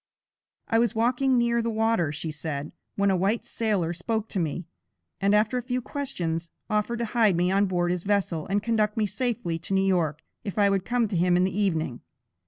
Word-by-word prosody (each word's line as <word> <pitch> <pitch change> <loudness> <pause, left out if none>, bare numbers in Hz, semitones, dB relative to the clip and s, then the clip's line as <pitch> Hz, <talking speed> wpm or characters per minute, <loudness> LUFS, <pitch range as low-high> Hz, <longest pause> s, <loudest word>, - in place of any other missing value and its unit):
"I 225 - +3
was 235 0 +1
walking 250 +3 +2
near 235 0 +2
the 230 - -1
water," 220 -8 +1
she 150 +2 -4
said, 150 -1 -4 0.2
"when 200 0 +2
a - - +3
white 195 +5 0
sailor 200 -7 0
spoke 220 +5 -2
to 195 - -2
me, 165 +1 -2 0.5
and 200 +1 +3
after 215 +4 +2
a - - -4
few 250 +1 -2
questions, 175 - -3 0.2
offered 215 +3 0
to 235 - -1
hide 220 -6 +4
me 180 +1 +2
on 200 +1 +3
board 175 -1 0
his 180 -1 -1
vessel 190 -5 0
and 200 +1 0
conduct 215 -2 +1
me 215 - +2
safely 210 -5 -2
to 190 +4 -3
New 190 0 +3
York, 165 -5 +1 0.2
if 200 - -5
I 200 -1 +4
would 195 -1 0
come 240 -1 +1
to 200 - -2
him 175 +1 +3
in 180 - +3
the 185 0 0
evening. 165 -11 0
200 Hz, 210 wpm, -26 LUFS, 175-230 Hz, 0.5 s, hide